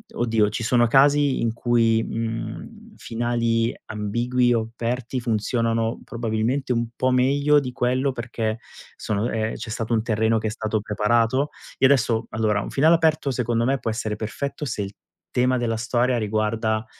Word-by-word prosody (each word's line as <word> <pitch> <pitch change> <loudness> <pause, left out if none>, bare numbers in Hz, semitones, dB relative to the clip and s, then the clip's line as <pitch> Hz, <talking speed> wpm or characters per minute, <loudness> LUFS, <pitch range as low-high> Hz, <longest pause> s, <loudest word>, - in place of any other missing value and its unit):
oddio, 115 -3 +2
ci 105 - -4
sono 120 +1 +3
casi 140 +2 +4
in 115 -1 0
cui, 115 -1 +2
mhmm, 115 - -5
finali 115 0 0
ambigui 120 +4 0
o 115 -1 -1
aperti 120 +2 -3
funzionano 115 0 0
probabilmente 120 +3 -1
un 120 -1 -1
po' 130 +1 +1
meglio 140 +4 +3
di 125 -2 -5
quello, 130 +3 0
perché 115 -2 -3 0.4
sono 110 +2 -1
ehm, 110 0 -1
c'è 115 0 -7
stato 110 +1 -2
un 110 -1 +1
terreno 110 0 +1
che 110 - -2
è - - 0
stato 110 -1 -2
preparato. 115 +6 +1 0.3
Io 130 - +6
adesso 115 -4 +2
allora, 110 -2 +1
un - - -6
finale 160 +4 +5
aperto 155 -4 +1
secondo 120 -2 0
me 135 +3 +1
può 115 - -3
essere 110 -1 -2
perfetto 140 +7 -4
se 120 - -3
il 100 0 -5 0.4
tema 125 +1 +2
della 115 -2 -1
storia 120 +2 +1
riguarda 110 +1 -1
115 Hz, 160 wpm, -23 LUFS, 110-125 Hz, 0.4 s, Io